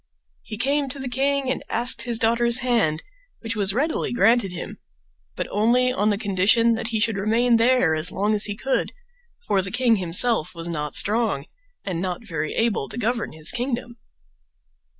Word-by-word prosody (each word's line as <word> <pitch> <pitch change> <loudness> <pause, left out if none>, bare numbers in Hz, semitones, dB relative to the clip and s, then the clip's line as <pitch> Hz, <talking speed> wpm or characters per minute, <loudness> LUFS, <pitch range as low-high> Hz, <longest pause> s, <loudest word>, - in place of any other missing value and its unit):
He 215 +1 -7
came 275 +3 0
to 260 - -4
the 265 -1 -5
king 275 +2 0
and - - -3
asked 240 +2 +1
his 240 -2 0
daughters 235 +2 +2
hand, 225 -11 0 0.4
which 230 0 -3
was 200 -2 +1
readily 290 +10 -1
granted 230 -3 +2
him, 180 - -7 0.6
but - - -3
only 245 +4 +2
on 210 -4 +1
the 205 - 0
condition 205 +3 +2
that 225 0 -3
he 225 -1 -2
should 220 -1 +1
remain 230 +4 +2
there 230 -7 +3
as 155 +2 +1
long 205 +3 0
as 210 0 +3
he 205 - -1
could, 265 +5 -2 0.5
for 195 - +1
the 185 - -6
king 240 0 +2
himself 185 +1 +2
was 165 0 -7
not 150 -4 -4
strong 210 -9 +1 0.4
and 180 -4 -3
not 185 +4 -4
very 155 -6 -4
able 225 -11 0
to - - -6
govern 235 -3 -2
his 155 0 0
kingdom. 240 -1 -4
225 Hz, 180 wpm, -23 LUFS, 190-245 Hz, 0.6 s, there